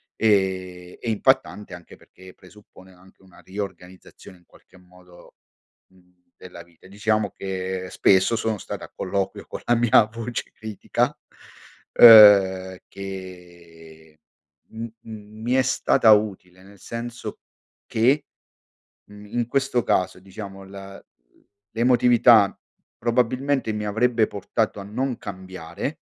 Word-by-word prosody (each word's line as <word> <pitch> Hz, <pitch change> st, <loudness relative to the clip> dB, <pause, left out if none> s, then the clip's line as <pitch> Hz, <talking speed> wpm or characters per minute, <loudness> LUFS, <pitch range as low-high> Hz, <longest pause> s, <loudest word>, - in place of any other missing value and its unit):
e 95 Hz, -4 st, -1 dB
e 120 Hz, -, -4 dB
impattante 105 Hz, -2 st, 0 dB
anche 90 Hz, -1 st, -12 dB
perché 95 Hz, 0 st, -17 dB
presuppone 95 Hz, -1 st, -19 dB
anche 90 Hz, +2 st, -22 dB
una 95 Hz, -2 st, -20 dB
riorganizzazione, 95 Hz, -2 st, -10 dB
in 90 Hz, -, -28 dB
qualche 95 Hz, -, -22 dB
modo, 90 Hz, -1 st, -20 dB, 0.5 s
mhmm, 90 Hz, -1 st, -30 dB
della -, -, -12 dB
vita. 85 Hz, +1 st, -21 dB
Diciamo 105 Hz, +1 st, -1 dB
che 95 Hz, -1 st, -5 dB
spesso 95 Hz, +4 st, +3 dB
sono 110 Hz, -1 st, -2 dB
stato -, -, -8 dB
a -, -, -11 dB
colloquio 95 Hz, +1 st, -4 dB
con -, -, -8 dB
la 120 Hz, -, +2 dB
mia 115 Hz, -1 st, +4 dB
voce 115 Hz, +2 st, -6 dB
critica, 110 Hz, -2 st, -3 dB, 0.8 s
uhm, 100 Hz, -5 st, +8 dB
che 85 Hz, -5 st, -12 dB, 0.5 s
m 110 Hz, +1 st, -8 dB, 0.2 s
m 110 Hz, -1 st, -12 dB
mi 120 Hz, +3 st, -1 dB
è 130 Hz, -, +4 dB
stata 130 Hz, -2 st, +3 dB
utile, 95 Hz, -4 st, -2 dB
nel 100 Hz, 0 st, -18 dB
senso 115 Hz, +3 st, -7 dB, 0.5 s
che, 130 Hz, +6 st, +1 dB, 0.8 s
mhmm, 105 Hz, 0 st, -14 dB
in 120 Hz, +2 st, -3 dB
questo 135 Hz, -1 st, 0 dB
caso, 90 Hz, -1 st, -1 dB
diciamo, 95 Hz, 0 st, -10 dB
la 95 Hz, 0 st, -11 dB, 0.7 s
l'emotività 120 Hz, -3 st, +4 dB, 0.4 s
probabilmente 125 Hz, +2 st, 0 dB
mi 105 Hz, 0 st, -4 dB
avrebbe 115 Hz, +2 st, +1 dB
portato 105 Hz, +1 st, -3 dB
a -, -, -7 dB
non 125 Hz, +5 st, -3 dB
cambiare, 95 Hz, -4 st, -7 dB
100 Hz, 120 wpm, -23 LUFS, 95-115 Hz, 0.8 s, uhm